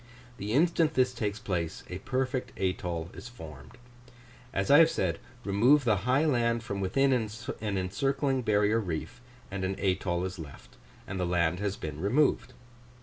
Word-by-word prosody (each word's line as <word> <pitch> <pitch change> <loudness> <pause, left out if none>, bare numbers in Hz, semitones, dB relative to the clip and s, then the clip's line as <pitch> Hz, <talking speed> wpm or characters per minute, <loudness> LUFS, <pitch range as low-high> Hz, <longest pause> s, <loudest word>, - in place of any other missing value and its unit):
The 105 +2 -3
instant 160 +2 +3
this 130 -1 +3
takes 105 -4 -2
place, 85 -5 -3
a 90 - -6
perfect 130 +2 -2
atoll 90 -2 -2
is 100 +6 -9
formed: 75 - -11 0.7
I 100 - 0 0.2
have 165 -1 +7
said, 85 - -1 0.3
remove 120 +9 +4
the 110 -4 +3
high 135 +5 +4
land 120 -5 +1
from 100 -2 -4
within 135 +9 +2
an 110 -3 -3
encircling 135 +8 0
barrier 105 0 +2
reef, 85 0 -5 0.3
and 95 -1 -3
an 95 +1 -2
atoll 90 -2 0
is 95 -1 -6
left, 75 -3 -11 0.3
and 95 -1 -5
the 90 - 0
land 85 0 +1
has 100 -1 -2
been 75 -1 -6
removed. 130 +9 +2
100 Hz, 155 wpm, -29 LUFS, 90-125 Hz, 0.7 s, have